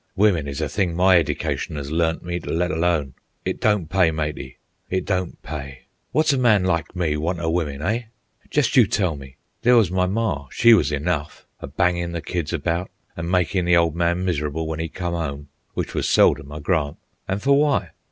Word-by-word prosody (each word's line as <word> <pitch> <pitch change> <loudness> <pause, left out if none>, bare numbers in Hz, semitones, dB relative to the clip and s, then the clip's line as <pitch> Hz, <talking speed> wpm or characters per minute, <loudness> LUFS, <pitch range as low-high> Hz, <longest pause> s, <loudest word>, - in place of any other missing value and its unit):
"Wimmen 95 -8 +3
is 70 -1 -4
a - - 0
thing 90 -5 -1
my 90 0 +5
edication 80 -1 -2
'as 70 0 -5
learnt 80 0 0
me 85 0 -3
t' - - -9
let 90 +2 0
alone. 80 -5 0 0.3
It - - -3
don't 105 -6 +2
pay, 90 0 +3
matey; 75 -4 -4 0.3
it 95 -1 -1
don't 90 -2 -2
pay. 70 -3 -7 0.3
Wot's 155 -1 +3
a 135 - 0
man 110 -6 +4
like 85 -1 -1
me 85 -4 0
want 85 +3 -2
o' 80 -1 -1
wimmen, 75 -4 -2
eh? 115 +6 -1 0.4
jest 145 -4 +1
you 120 -5 +6
tell 95 -6 0
me. 65 -2 -11 0.3
There 125 +1 +5
was 105 -7 +3
my 90 0 +1
mar, 95 -9 -1
she 115 - +5
was 90 -9 +3
enough, 75 0 -2
a - - -7
bangin' 85 +3 0
the 85 - -3
kids 85 -4 -3
about 85 +3 -1 0.3
an' 85 0 -4
makin' 90 +1 +1
the 85 0 +5
ole 85 -1 +3
man 85 +2 0
mis'rable 80 -2 -1
when 80 0 -3
'e 80 - -2
come 85 +1 -4
'ome, 75 -3 -4 0.3
w'ich - - -3
was - - -1
seldom, 70 - +3
I 75 0 -7
grant. 75 -3 0 0.3
An' 95 - -1
fer 135 +7 0
w'y? 145 +1 +3
85 Hz, 205 wpm, -22 LUFS, 75-95 Hz, 0.4 s, you